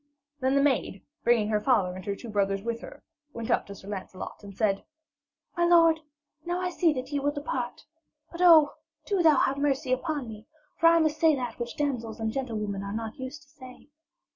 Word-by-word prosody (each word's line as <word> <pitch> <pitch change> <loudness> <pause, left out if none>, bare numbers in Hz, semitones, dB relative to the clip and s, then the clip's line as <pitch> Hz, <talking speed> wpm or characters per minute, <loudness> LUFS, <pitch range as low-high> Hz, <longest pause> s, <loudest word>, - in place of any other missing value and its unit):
Then 260 0 +1
the 280 - +4
maid, 260 -8 0 0.2
bringing 230 -3 +3
her 210 -1 +2
father 195 -8 +2
and 185 - -8
her 200 - -2
two 235 - -10
brothers 195 -1 0
with 235 0 -3
her, - - -11 0.3
went 230 -1 -4
up - - +1
to 200 - -8
Sir 195 - -13
Lancelot 190 0 -7
and 200 -1 -11
said: 200 -3 +1 0.7
'My 345 - +1
lord, 330 -2 +5 0.4
now 350 +2 -2
I 365 0 -2
see 345 -2 +2
that 260 0 -5
ye 285 - 0
will 285 +1 +1
depart. 285 -4 -4 0.5
But 340 - -6
oh, 325 -5 +7 0.3
do 395 -3 +1
thou 315 -4 +5
have 275 +2 +1
mercy 275 -2 +1
upon 285 0 -2
me, 220 0 -10 0.3
for 330 - +6
I 335 0 +6
must 310 -1 +1
say 320 -2 +5
that 250 -3 -5
which 240 0 -5
damsels 245 -7 -2
and 220 0 -1
gentlewomen 215 -6 -3
are 200 0 -5
not 225 +4 -5
used 265 +3 -7
to 280 - -26
say.' 260 0 -14
255 Hz, 210 wpm, -27 LUFS, 220-300 Hz, 0.7 s, oh